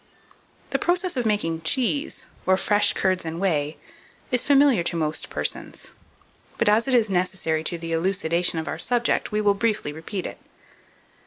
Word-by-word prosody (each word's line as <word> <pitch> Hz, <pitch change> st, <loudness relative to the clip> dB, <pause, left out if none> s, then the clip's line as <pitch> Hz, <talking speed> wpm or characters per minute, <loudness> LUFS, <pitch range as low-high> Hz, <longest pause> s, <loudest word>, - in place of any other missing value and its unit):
The -, -, 0 dB
process 355 Hz, 0 st, +1 dB
of 245 Hz, -3 st, 0 dB
making 165 Hz, -6 st, 0 dB
cheese, 260 Hz, -, 0 dB, 0.2 s
or 185 Hz, 0 st, +4 dB
fresh 205 Hz, +2 st, +2 dB
curds 185 Hz, -1 st, 0 dB
and 165 Hz, 0 st, -5 dB
whey, 155 Hz, -6 st, 0 dB, 0.5 s
is 250 Hz, -1 st, +2 dB
familiar 280 Hz, -, +4 dB
to 170 Hz, -, -1 dB
most 155 Hz, -1 st, -1 dB
persons; 75 Hz, 0 st, -3 dB, 0.7 s
but -, -, +1 dB
as 215 Hz, +4 st, +3 dB
it 260 Hz, -, +3 dB
is 230 Hz, -2 st, +4 dB
necessary 180 Hz, -4 st, 0 dB
to 175 Hz, -, 0 dB
the 165 Hz, 0 st, -5 dB
elucidation 170 Hz, -1 st, +1 dB
of 160 Hz, -, -3 dB
our -, -, -4 dB
subject, 240 Hz, -1 st, +1 dB
we 210 Hz, 0 st, 0 dB
will 205 Hz, -1 st, +4 dB
briefly 205 Hz, -7 st, -1 dB
repeat 170 Hz, +5 st, -5 dB
it. -, -, -7 dB
190 Hz, 165 wpm, -24 LUFS, 165-230 Hz, 0.7 s, or